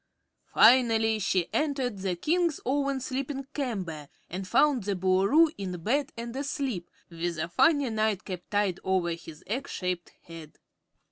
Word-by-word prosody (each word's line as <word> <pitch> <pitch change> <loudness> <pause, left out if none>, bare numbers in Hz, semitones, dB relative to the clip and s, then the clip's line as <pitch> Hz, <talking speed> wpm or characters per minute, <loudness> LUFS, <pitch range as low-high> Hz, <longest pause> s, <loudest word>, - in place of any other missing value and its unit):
Finally 225 -2 +5
she 185 -3 +1
entered 270 -8 -1
the 190 -2 -1
King's 335 - 0
own 275 0 0
sleeping 270 +1 -4
chamber 185 - -4 0.2
and 185 +2 -5
found 270 +3 +3
the 200 0 -1
Boolooroo 195 - +4
in 185 -2 -4
bed 280 - 0
and 235 +1 -6
asleep, 270 - -3 0.2
with 170 0 -3
a 165 +1 -2
funny 285 - +3
nightcap 210 -4 -1
tied 205 -3 0
over 185 -2 +1
his 165 -2 -8
egg 245 +9 -3
shaped 180 -2 -3
head. 165 -2 -11
215 Hz, 140 wpm, -28 LUFS, 180-270 Hz, 0.2 s, Finally